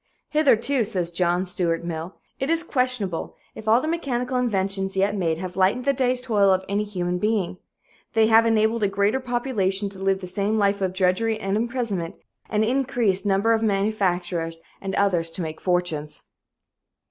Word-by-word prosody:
"Hitherto," 275 Hz, -4 st, +3 dB
says 185 Hz, -5 st, -1 dB
John 175 Hz, +1 st, +1 dB
Stuart 170 Hz, -2 st, -1 dB
Mill, 170 Hz, +1 st, -5 dB, 0.2 s
"it 270 Hz, -, -2 dB
is 330 Hz, 0 st, +1 dB
questionable 250 Hz, -, -1 dB, 0.2 s
if 220 Hz, -, -10 dB
all 225 Hz, +2 st, +5 dB
the 310 Hz, -, -3 dB
mechanical 260 Hz, -6 st, -2 dB
inventions 195 Hz, -5 st, 0 dB
yet 200 Hz, +2 st, +2 dB
made 165 Hz, -5 st, 0 dB
have 185 Hz, +1 st, -6 dB
lightened 195 Hz, +7 st, +2 dB
the 280 Hz, -, +3 dB
day's 255 Hz, -1 st, +1 dB
toil 205 Hz, -5 st, +3 dB
of 190 Hz, 0 st, +2 dB
any 200 Hz, +2 st, 0 dB
human 180 Hz, -3 st, -2 dB
being. 205 Hz, -3 st, -1 dB, 0.5 s
They 225 Hz, -1 st, +4 dB
have 225 Hz, +1 st, +5 dB
enabled 225 Hz, 0 st, +2 dB
a 205 Hz, -, +3 dB
greater 200 Hz, +5 st, +1 dB
population 240 Hz, -6 st, -1 dB
to 195 Hz, -1 st, -11 dB
live 195 Hz, 0 st, +1 dB
the 190 Hz, -, -7 dB
same 200 Hz, +4 st, -1 dB
life 200 Hz, -1 st, +1 dB
of 185 Hz, -1 st, 0 dB
drudgery 190 Hz, +4 st, +1 dB
and 195 Hz, -1 st, -1 dB
imprisonment, 225 Hz, -7 st, -2 dB, 0.3 s
and 210 Hz, 0 st, +1 dB
an 220 Hz, -, +1 dB
increased 240 Hz, -8 st, 0 dB
number 200 Hz, +3 st, +3 dB
of 220 Hz, -, +1 dB
manufacturers 190 Hz, -5 st, 0 dB, 0.2 s
and 195 Hz, -1 st, -3 dB
others 180 Hz, -5 st, +1 dB
to 170 Hz, +2 st, -3 dB
make 160 Hz, -1 st, -6 dB
fortunes." 175 Hz, -5 st, -1 dB
200 Hz, 175 wpm, -24 LUFS, 185-230 Hz, 0.5 s, all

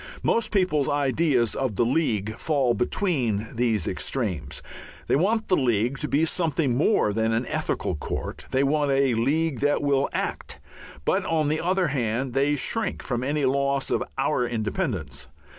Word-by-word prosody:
Most 230 Hz, -, +2 dB
people's 180 Hz, -8 st, +1 dB
ideas 140 Hz, -4 st, +2 dB
of 130 Hz, -6 st, -2 dB
the 120 Hz, -, +2 dB
League 110 Hz, -6 st, 0 dB
fall 135 Hz, -2 st, +1 dB
between 120 Hz, -, 0 dB
these 115 Hz, -6 st, 0 dB
extremes. 90 Hz, -, -3 dB, 0.4 s
They -, -, +2 dB
want 215 Hz, +9 st, +1 dB
the 185 Hz, -, +3 dB
League 120 Hz, -, +1 dB
to 150 Hz, -, -1 dB
be 150 Hz, +3 st, +2 dB
something 160 Hz, -6 st, 0 dB
more 135 Hz, -, +2 dB
than 110 Hz, +1 st, +1 dB
an 115 Hz, +3 st, 0 dB
ethical 95 Hz, -, -2 dB
court, 75 Hz, -, -5 dB
they 130 Hz, +1 st, +2 dB
want 145 Hz, +1 st, +1 dB
a 135 Hz, -2 st, +3 dB
League 140 Hz, +4 st, 0 dB
that 145 Hz, 0 st, +1 dB
will 140 Hz, -1 st, +2 dB
act, -, -, -4 dB, 0.5 s
but 190 Hz, +1 st, +2 dB
on 155 Hz, -3 st, +1 dB
the 155 Hz, +1 st, 0 dB
other 185 Hz, -1 st, +1 dB
hand 125 Hz, -1 st, -1 dB
they 140 Hz, +2 st, +2 dB
shrink 180 Hz, -, -2 dB
from 120 Hz, -1 st, -2 dB
any 145 Hz, +1 st, 0 dB
loss 140 Hz, +1 st, 0 dB
of -, -, +1 dB
"our 125 Hz, -, +1 dB
independence." 115 Hz, -, -3 dB
135 Hz, 160 wpm, -25 LUFS, 120-155 Hz, 0.5 s, the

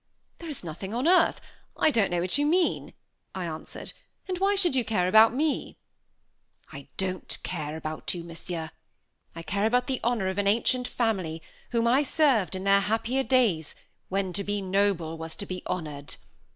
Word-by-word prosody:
"There 335 Hz, -, -7 dB
is 290 Hz, -, -6 dB
nothing 185 Hz, +6 st, -6 dB
on 255 Hz, +6 st, +1 dB
earth 365 Hz, +1 st, +5 dB, 0.4 s
I -, -, +4 dB
don't 220 Hz, -7 st, +2 dB
know 175 Hz, -1 st, 0 dB
what 185 Hz, +10 st, 0 dB
you -, -, +3 dB
mean," 350 Hz, +2 st, +1 dB, 0.4 s
I 185 Hz, -2 st, -3 dB
answered, 160 Hz, -1 st, -6 dB, 0.3 s
"and 365 Hz, -2 st, -3 dB
why 395 Hz, +1 st, +3 dB
should 360 Hz, -8 st, +2 dB
you 255 Hz, -, +2 dB
care 195 Hz, -6 st, +1 dB
about 220 Hz, +4 st, +7 dB
me?" 295 Hz, +4 st, -1 dB, 1.0 s
"I -, -, -9 dB
don't 185 Hz, -1 st, -2 dB
care 155 Hz, -3 st, -4 dB
about 155 Hz, 0 st, -4 dB
you, 170 Hz, -, -5 dB
Monsieur 165 Hz, -1 st, -6 dB, 0.6 s
I 165 Hz, -, -7 dB
care 200 Hz, +5 st, 0 dB
about 250 Hz, +2 st, +2 dB
the 265 Hz, -2 st, -1 dB
honor 230 Hz, -5 st, +1 dB
of 190 Hz, +1 st, -1 dB
an 200 Hz, -, +1 dB
ancient 245 Hz, +4 st, +2 dB
family, 185 Hz, -9 st, -1 dB, 0.3 s
whom 230 Hz, -1 st, +1 dB
I 250 Hz, +4 st, +4 dB
served 265 Hz, -, +2 dB
in 185 Hz, -, -4 dB
their 200 Hz, 0 st, +5 dB
happier 225 Hz, +5 st, 0 dB
days, 230 Hz, -, +2 dB, 0.3 s
when 190 Hz, -1 st, -1 dB
to 200 Hz, -, -1 dB
be 205 Hz, +1 st, -1 dB
noble 190 Hz, -4 st, 0 dB
was 160 Hz, 0 st, -5 dB
to 200 Hz, -, -5 dB
be 185 Hz, -2 st, -5 dB
honored. 150 Hz, -5 st, -4 dB
200 Hz, 180 wpm, -27 LUFS, 175-250 Hz, 1.0 s, about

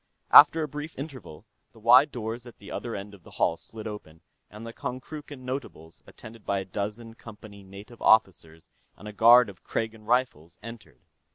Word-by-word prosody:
After 160 Hz, +2 st, +8 dB
a -, -, -3 dB
brief 150 Hz, +2 st, -8 dB
interval, 135 Hz, -, -9 dB, 0.3 s
the -, -, -18 dB
wide 125 Hz, +6 st, +5 dB
doors 115 Hz, +1 st, -6 dB
at 120 Hz, -, -14 dB
the 100 Hz, -, -13 dB
other 120 Hz, -, -5 dB
end 100 Hz, +1 st, -8 dB
of 100 Hz, -, -15 dB
the -, -, -17 dB
hall -, -, 0 dB
slid 110 Hz, -1 st, -11 dB
open, 95 Hz, -7 st, -9 dB, 0.3 s
and 105 Hz, +2 st, -11 dB
the 115 Hz, -, -8 dB
Konkrookan 140 Hz, +3 st, -8 dB
notables, 125 Hz, -, -7 dB
attended 110 Hz, -1 st, -14 dB
by 100 Hz, -, -1 dB
a 95 Hz, -, -4 dB
dozen 105 Hz, +4 st, -6 dB
Company 105 Hz, -3 st, -13 dB
native 100 Hz, +5 st, -14 dB
officers 85 Hz, -7 st, +1 dB, 0.3 s
and 105 Hz, -, -12 dB
a 105 Hz, -, -8 dB
guard 120 Hz, +4 st, +6 dB
of 95 Hz, -3 st, -13 dB
Kragan 110 Hz, -1 st, -5 dB
Rifles, 105 Hz, -, -1 dB
entered. 110 Hz, -, -12 dB
110 Hz, 180 wpm, -26 LUFS, 100-125 Hz, 0.3 s, After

